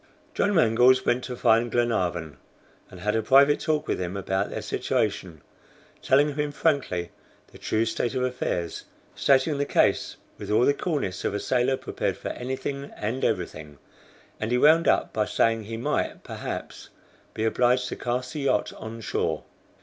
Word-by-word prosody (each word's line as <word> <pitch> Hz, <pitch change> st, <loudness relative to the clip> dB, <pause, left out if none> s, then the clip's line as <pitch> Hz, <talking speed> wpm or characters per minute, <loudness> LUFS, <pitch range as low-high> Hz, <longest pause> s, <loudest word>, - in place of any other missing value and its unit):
John 205 Hz, -, +1 dB
Mangles 125 Hz, -2 st, +4 dB
went 120 Hz, +1 st, +1 dB
to 125 Hz, -, -5 dB
find 115 Hz, 0 st, +3 dB
Glenarvan, 90 Hz, -10 st, -1 dB, 0.5 s
and 90 Hz, -, -12 dB
had 105 Hz, +2 st, 0 dB
a 110 Hz, -, +2 dB
private 140 Hz, +5 st, +5 dB
talk 155 Hz, -1 st, -1 dB
with -, -, -1 dB
him 90 Hz, +2 st, -3 dB
about 95 Hz, +1 st, -1 dB
their -, -, -5 dB
situation, 80 Hz, -5 st, -2 dB, 0.6 s
telling 145 Hz, +2 st, +3 dB
him 150 Hz, 0 st, -2 dB
frankly 140 Hz, -, 0 dB, 0.4 s
the -, -, -15 dB
true 110 Hz, +1 st, 0 dB
state 115 Hz, +2 st, -2 dB
of 130 Hz, -, 0 dB
affairs, 125 Hz, -9 st, -3 dB, 0.3 s
stating 140 Hz, +2 st, +2 dB
the 145 Hz, -, +1 dB
case -, -, +1 dB, 0.2 s
with -, -, -7 dB
all 110 Hz, +3 st, +4 dB
the 145 Hz, -, +4 dB
coolness 140 Hz, -, -3 dB
of -, -, -1 dB
a -, -, -1 dB
sailor 125 Hz, +3 st, +1 dB
prepared -, -, -3 dB
for -, -, -5 dB
anything 130 Hz, +2 st, -4 dB
and 115 Hz, +5 st, -3 dB
everything 80 Hz, -7 st, -2 dB, 0.6 s
and 110 Hz, -, -2 dB
he 125 Hz, -, +3 dB
wound 160 Hz, +5 st, +5 dB
up -, -, +2 dB
by 105 Hz, -1 st, +1 dB
saying 115 Hz, +1 st, +1 dB
he 115 Hz, +1 st, -5 dB
might, 115 Hz, -, -2 dB
perhaps, -, -, -7 dB, 0.5 s
be 110 Hz, -, -2 dB
obliged 125 Hz, +2 st, +2 dB
to -, -, -4 dB
cast 125 Hz, +2 st, -3 dB
the 155 Hz, -, -4 dB
yacht 135 Hz, -7 st, 0 dB
on 115 Hz, +1 st, -7 dB
shore. -, -, -2 dB
120 Hz, 170 wpm, -26 LUFS, 105-135 Hz, 0.6 s, private